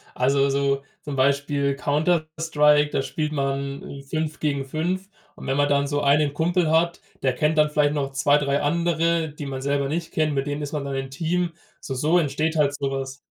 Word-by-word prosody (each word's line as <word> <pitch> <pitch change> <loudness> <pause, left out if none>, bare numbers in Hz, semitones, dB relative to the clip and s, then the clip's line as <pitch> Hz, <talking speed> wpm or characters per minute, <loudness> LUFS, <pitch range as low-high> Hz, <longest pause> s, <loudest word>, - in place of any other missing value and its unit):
Also, 135 +2 +2
so 140 0 0 0.2
zum 145 -2 -5
Beispiel 140 +1 +1
„Counter 155 +3 +1
Strike“, 150 -2 +3
da - - 0
spielt 155 +2 -3
man, 140 -1 -2
hm, 140 0 -9
5 155 +2 -3
gegen 140 -3 -1
5. 180 +7 -2 0.3
Und, - - -9
wenn 135 - 0
man 145 0 +3
dann 140 0 +2
so 145 0 -1
einen 145 0 +3
Kumpel 170 +2 +1
hat 170 +2 +2 0.2
der 130 -1 +2
kennt 150 +4 +1
dann 150 0 +4
vielleicht 150 -1 +2
noch 140 -2 -2
2, 145 +1 +3
3 140 -1 0
andere, 165 +1 +1
die 150 -1 -7
man 135 -1 -5
selber 140 0 0
nicht 165 +3 -3
kennt 155 -1 +1
mit 135 0 0
denen 145 0 -3
ist 145 0 -5
man 150 -2 -2
dann 140 - -4
im 135 0 -3
Team. 165 +4 -1 0.3
So 135 - -5
so 155 +7 +3
entsteht 155 +1 0
halt 145 -2 +3
so 140 -1 -2
was. 135 0 -4
145 Hz, 210 wpm, -24 LUFS, 140-155 Hz, 0.3 s, dann